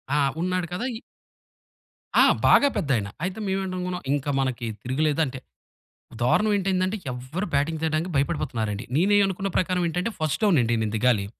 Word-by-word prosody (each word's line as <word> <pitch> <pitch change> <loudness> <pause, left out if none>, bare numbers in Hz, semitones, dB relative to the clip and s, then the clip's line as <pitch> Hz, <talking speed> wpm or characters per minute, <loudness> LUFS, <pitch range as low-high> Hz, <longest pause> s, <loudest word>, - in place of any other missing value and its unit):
ఆ! - - +3 0.2
ఉన్నాడు 185 0 -1
కదా! 220 +7 -2
ఇ - - -10 1.2
ఆ! - - +8 0.2
బాగా 285 - +6
పెద్దయన. 130 - 0 0.2
అయితే 185 +4 -3
మేవెంటనుకున్నాం, 185 -2 -2
ఇంక 145 -1 -2
మనకి 130 -2 -1 0.2
తిరగులేదు 145 +5 0
అంటే 130 -1 -6 0.8
దారుణం 210 - +3
ఏంటయ్యిదంటే 190 +1 0 0.2
ఎవరు 130 +11 -4
బ్యాటింగ్ 150 +3 +1
చేయడానికి 160 +3 0
భయపడిపోతున్నారండి. 125 -8 -1
నేనేం 205 +6 +4
అనుకున్న 195 +1 -2
ప్రకారం 185 0 +1
ఏంటంటే, 180 +7 -2
ఫస్ట్ 155 +5 -1
డౌన్ 200 -6 +4
అండి 120 0 +1
నేను 105 0 -2
దిగాలి. 110 -3 +2
160 Hz, 145 wpm, -25 LUFS, 130-185 Hz, 1.2 s, ఆ